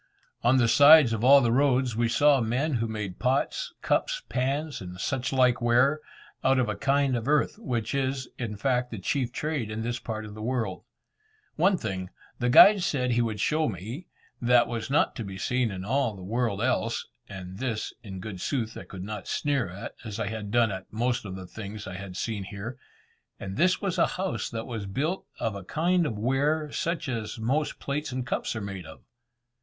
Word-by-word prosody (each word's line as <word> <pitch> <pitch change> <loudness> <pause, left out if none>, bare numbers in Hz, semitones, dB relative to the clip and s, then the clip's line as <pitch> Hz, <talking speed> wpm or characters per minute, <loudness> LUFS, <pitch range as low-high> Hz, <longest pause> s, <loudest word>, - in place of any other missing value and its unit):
On 120 +3 +4
the 120 -2 +4
sides 145 0 +8
of 110 0 -2
all 140 +2 +8
the 120 -2 +2
roads, 130 -2 +2
we 115 0 +1
saw 145 +2 +4
men 130 +7 0
who 115 - 0
made 105 -4 -5
pots, 140 - 0
cups, - - 0
pans, 140 +4 -1
and 90 -1 -8
such 135 +4 -1
like 125 -2 +3
ware, 125 +5 +3 0.4
out 135 0 +4
of 125 -3 +2
a 105 - -2
kind 140 +1 +2
of 115 +1 -3
earth, 150 +7 +2
which 120 - -2
is, 135 -1 -1
in 110 -4 -4
fact, 125 +1 0
the 110 - -6
chief 125 +5 -1
trade 150 -5 -2
in 110 +1 -4
this 120 +1 -2
part 110 -1 -5
of 105 - -9
the 110 - -9
world. 115 -5 -2 0.7
One 185 +4 +3
thing, 95 - -4 0.3
the 120 - +1
guide 200 +10 +8
said 125 -7 0
he 120 0 +2
would 110 -3 -2
show 155 +8 +1
me, 110 - -7 0.3
that 120 0 +4
was 115 0 -4
not 145 - +2
to 115 - -3
be 95 -2 -7
seen 125 +3 0
in 95 -2 -6
all 125 -1 0
the 95 - -10
world 110 0 -1
else 120 -3 0 0.2
(and 95 -1 -8
this, 115 -5 -2
in 95 -4 -8
good 95 -2 -7
sooth, 115 -5 -2
I - - -8
could 95 -1 -8
not 105 0 -6
sneer 140 -9 0
at, 95 +3 -7
as 110 -2 -6
I 105 -2 -1
had 110 -2 -5
done 115 0 +3
at 95 -1 -7
most 120 +2 -1
of 95 -2 -6
the 95 -1 -7
things 105 +2 -8
I 95 - -6
had 95 0 -7
seen 105 -4 -3
here), 105 +5 -7 0.6
and 95 -1 -6
this 185 - +2
was 190 -2 -1
a - - +5
house 190 0 -2
that 115 -1 -5
was 110 -5 -5
built 150 - -2
of 110 - -1
a 100 -1 -7
kind 170 - +1
of 110 - -4
ware, 145 +6 +1
such 170 -2 -2
as 115 -4 -3
most 135 +7 -1
plates 140 +1 -3
and 125 0 -3
cups 120 - -2
are 110 - -3
made 95 -4 -6
of. 80 - -13
120 Hz, 210 wpm, -27 LUFS, 105-140 Hz, 0.7 s, sides